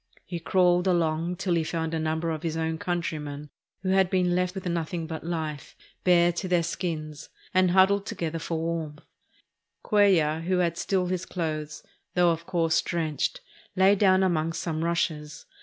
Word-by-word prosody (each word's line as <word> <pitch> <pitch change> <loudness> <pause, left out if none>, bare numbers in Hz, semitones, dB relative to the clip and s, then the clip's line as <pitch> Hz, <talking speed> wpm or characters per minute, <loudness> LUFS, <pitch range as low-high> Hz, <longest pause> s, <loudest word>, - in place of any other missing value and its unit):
He 175 -1 -5
crawled 180 +1 +3
along 170 -1 +1
till 180 0 -1
he 165 -1 +2
found 160 0 -3
a 165 - 0
number 160 +1 -1
of 155 -2 -4
his 165 -1 -2
countr3rmen 160 -3 -3 0.3
who 185 - -1
had 190 -1 +3
been 180 -1 +2
left 180 +1 0
with 190 - -6
nothing 170 -1 -2
but 160 -1 -6
hfe, 160 -3 -4 0.3
bare 175 -1 +5
to 175 +3 -4
their 175 -2 +2
skins, 160 -3 -4 0.2
and 185 -1 +4
huddled 195 +2 +4
together 165 -6 -3
for 165 +1 -3
warmth. 160 -2 -4 0.8
Cuellar, 175 -7 +3
who 180 +2 0
had 170 -2 +1
still 190 -2 0
his 180 0 -3
clothes, 155 -3 -4 0.3
though 175 -1 +4
of 165 0 -4
course 165 -3 +2
drenched, 165 - -2 0.3
lay 190 +1 +5
down 190 -2 +4
among 165 -3 +1
some 160 -1 -3
rushes. 160 -3 -2
170 Hz, 165 wpm, -27 LUFS, 160-180 Hz, 0.8 s, bare